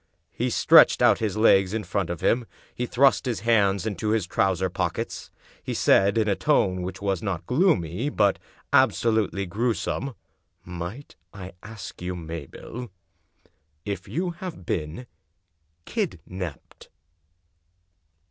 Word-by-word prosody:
He - - -2
stretched - - +6
out - - +5
his 110 -2 -2
legs 95 -2 +4
in 110 - -2
front 95 -1 -2
of 85 -2 -4
him; 120 -1 +1 0.3
he 125 - -3
thrust 135 +2 +3
his 115 -6 -2
hands 100 -3 +2
into 105 0 -2
his 110 -4 +1
trousers 95 0 0
pockets; - - -3 0.3
he - - -4
said, 100 +2 +4
in 110 -1 +2
a 100 - +2
tone 95 -11 +1
which 95 +2 -6
was 95 -3 0
not 95 -6 -3
gloomy 125 - +1
but 100 -8 +2 0.3
ab - - +5
solutely 110 -4 0
grewsome: 115 +6 -2 0.2
" - - -44
Might 90 +10 -7 0.2
I 95 -2 -8
ask, 105 -4 -9
Mabel, 90 - -6 1.0
if 100 -3 -4
you 175 +3 -2
have 170 - -8
been 80 +11 -3 0.8
kidnaped? 90 -7 -5
100 Hz, 130 wpm, -25 LUFS, 90-115 Hz, 1.0 s, stretched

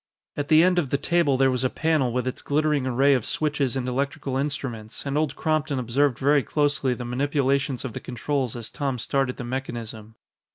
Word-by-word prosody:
At 145 0 -3
the 155 +2 +6
end 180 0 +4
of 145 -7 -2
the 140 - +1
table 165 -4 +2
there 135 0 +4
was 125 0 -1
a 130 - +2
panel 155 -5 +1
with 125 0 -1
its 130 - -3
glittering 150 -2 +1
array 135 +3 +4
of 125 -4 +1
switches 145 -3 0
and 130 -1 -2
electrical 135 +1 -2
instruments, 135 -6 -4
and 140 0 -2
Old 150 -2 0
Crompton 155 -2 0
observed 130 +1 +1
very 145 +1 +3
closely 145 -3 +1
the 120 - -6
manipulations 135 +1 0
of 125 - -5
the - - -5
controls 125 0 -2
as 115 -2 -7
Tom 135 -3 -2
started 130 +2 -1
the 125 - -5
mechanism. 115 -3 -6
135 Hz, 200 wpm, -25 LUFS, 125-145 Hz, -, the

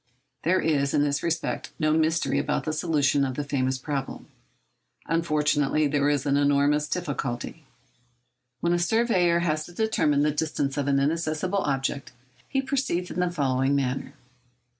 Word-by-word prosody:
There 185 +3 +2
is, 140 -3 +1
in 145 - +3
this 145 -1 0
respect, 165 0 -2
no 155 -1 +2
mystery 160 -2 +1
about 145 +1 -1
the 155 - -2
solution 150 -3 +1
of 130 -2 -2
the 145 - -2
famous 130 -2 -1
problem. 135 0 -5 0.8
Unfortunately, 150 -2 +1
there 145 0 +1
is 145 -2 0
enormous 145 +1 +2
difficulty. 145 -2 -4 1.0
When 170 0 +2
a 175 - +1
surveyor 180 -3 +2
has 155 -2 0
to 175 - -13
determine 170 -9 +1
the 150 - +2
distance 145 -2 -2
of 145 -1 -1
an 140 -1 +3
inaccessible 160 +6 0
object, 140 -3 -2 0.4
he 270 0 0
proceeds 260 - -1
in - - -4
the 180 0 +2
following 135 -4 +1
manner. 135 0 -2
150 Hz, 150 wpm, -26 LUFS, 140-170 Hz, 1.0 s, in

